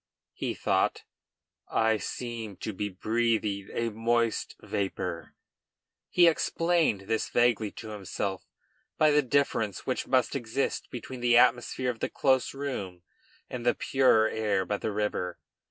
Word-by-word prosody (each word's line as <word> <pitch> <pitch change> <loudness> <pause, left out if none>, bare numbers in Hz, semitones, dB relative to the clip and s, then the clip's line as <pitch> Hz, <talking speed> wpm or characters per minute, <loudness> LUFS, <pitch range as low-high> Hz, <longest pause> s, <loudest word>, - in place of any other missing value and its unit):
he - - -3
thought; - - +1 0.7
"I 110 0 +2
seem 115 -2 -5
to 110 - -5
be 105 +2 -3
breathing 110 0 0
a 115 0 -1
moist 115 +1 0
vapor." 90 -3 -4 0.7
He 175 - +5
explained 165 - +2
this 110 +3 -1
vaguely 120 -3 +2
to 110 - -8
himself 100 -2 -4 0.5
by 155 -1 +5
the 150 0 +5
difference 125 -7 0
which 130 - -2
must 130 0 +2
exist 120 +1 -2
between 125 +1 -7
the 120 0 +4
atmosphere 125 +1 +3
of 115 - -11
the - - -1
close 130 -1 +1
room 100 -11 -5 0.4
and 125 -2 -6
the 120 0 +3
purer 130 -5 +3
air 105 -4 0
by 105 - -1
the 110 - -3
river. 100 -4 -2
115 Hz, 140 wpm, -28 LUFS, 105-125 Hz, 0.7 s, He